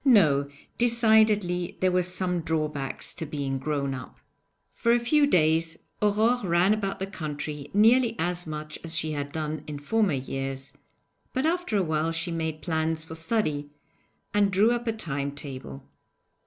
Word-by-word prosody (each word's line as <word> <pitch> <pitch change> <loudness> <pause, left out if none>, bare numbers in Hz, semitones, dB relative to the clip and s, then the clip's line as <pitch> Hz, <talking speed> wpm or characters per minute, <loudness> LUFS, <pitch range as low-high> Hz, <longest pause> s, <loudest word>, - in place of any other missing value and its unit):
No; 155 - +5 0.3
decidedly 220 -6 +3
there 185 0 +3
were 180 0 +3
some 180 0 -1
drawbacks 155 -4 -2
to 170 - -4
being 140 -3 -3
'grown 140 -1 -1
up'! 125 -2 -8 0.6
For 235 - +2
a 240 - +4
few 285 +5 +3
days 160 - +2 0.2
Aurore 220 +4 +3
ran 180 +2 +3
about 200 -2 -2
the 190 - -3
country 150 -5 -5
nearly 225 +3 +4
as 175 +1 -2
much 155 0 -6
as 165 0 -3
she 155 -1 -1
had 145 -1 -3
done 155 -1 -3
in 150 -1 -5
former 205 +5 +1
years, 135 0 -4 0.6
but 260 +2 0
after 335 -9 +1
a 195 - +2
while 160 0 0
she 165 +1 -3
made 160 -2 -3
plans 160 -1 -1
for 160 - -9
study, 160 -4 -1 0.6
and 205 -1 +3
drew 205 +5 +4
up 240 0 -2
a - - +3
time 140 -10 -3
table. 130 - -7
165 Hz, 160 wpm, -27 LUFS, 150-210 Hz, 0.6 s, No